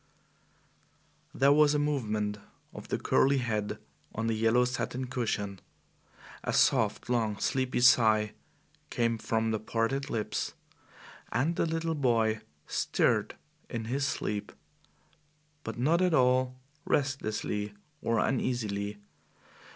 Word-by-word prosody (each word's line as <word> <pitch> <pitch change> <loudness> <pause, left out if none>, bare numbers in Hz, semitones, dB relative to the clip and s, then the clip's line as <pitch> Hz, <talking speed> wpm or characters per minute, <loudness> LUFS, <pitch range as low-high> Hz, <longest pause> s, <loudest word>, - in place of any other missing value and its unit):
There 140 +2 +4
was 150 0 +5
a - - +3
movement 110 -8 -1 0.3
of - - -9
the - - -1
curly 140 +1 +3
head 110 -5 -2 0.4
on 115 - -2
the 115 - +1
yellow 115 +3 +3
satin 125 +1 -3
cushion. 110 -6 -2 0.8
A - - -1
soft, - - +2
long, 115 -4 0
sleepy 130 +1 0
sigh 110 -3 +5 0.6
came 115 -1 0
from 110 0 0
the 110 - 0
parted 120 +6 -1
lips, 105 -3 -2 0.8
and 140 +9 +1
the - - +1
little 165 0 -1
boy 115 -6 +1 0.2
stirred - - +1 0.3
in 115 -1 -4
his 140 +4 0
sleep, 105 -5 -3 1.1
but 115 - -5
not 155 +8 +2
at 180 -3 +3
all 130 0 +2 0.2
restlessly 110 -6 -1 0.3
or 115 0 0
uneasily. 105 -5 -1
120 Hz, 115 wpm, -30 LUFS, 110-135 Hz, 1.1 s, was